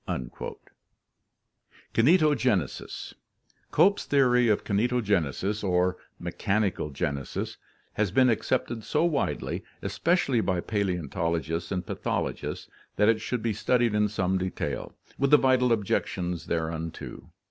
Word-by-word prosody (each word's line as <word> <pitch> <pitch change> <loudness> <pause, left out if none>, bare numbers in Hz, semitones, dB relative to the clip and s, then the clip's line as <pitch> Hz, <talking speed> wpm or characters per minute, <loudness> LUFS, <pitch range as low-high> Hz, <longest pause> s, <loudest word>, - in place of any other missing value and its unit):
KINETOGENESIS 130 - +2 0.6
Cope's 195 +6 +4
theory 125 -3 +4
of 105 -2 +2
kinetogenesis 105 - 0
or 90 -1 +2 0.2
"mechanical 100 -6 -1
genesis" 70 -1 -3 0.4
has 105 -2 +1
been 130 +7 +4
accepted 115 0 0
so 155 +8 +1
widely, 150 -5 -1 0.2
especially 160 -9 +1
by 95 -4 0
paleontologists 85 -4 -2
and 90 -2 -2
pathologists, - - -3 0.3
that 105 +1 +4
it 110 -1 +2
should 120 0 -3
be 115 -2 +1
studied 120 +1 +2
in 105 0 +3
Some 95 -3 0
detail, 95 0 -3 0.2
with 140 0 +2
the 150 - +8
vital 130 -2 +3
objections 90 -5 -1
thereunto. 80 0 -4
105 Hz, 105 wpm, -27 LUFS, 90-125 Hz, 0.6 s, the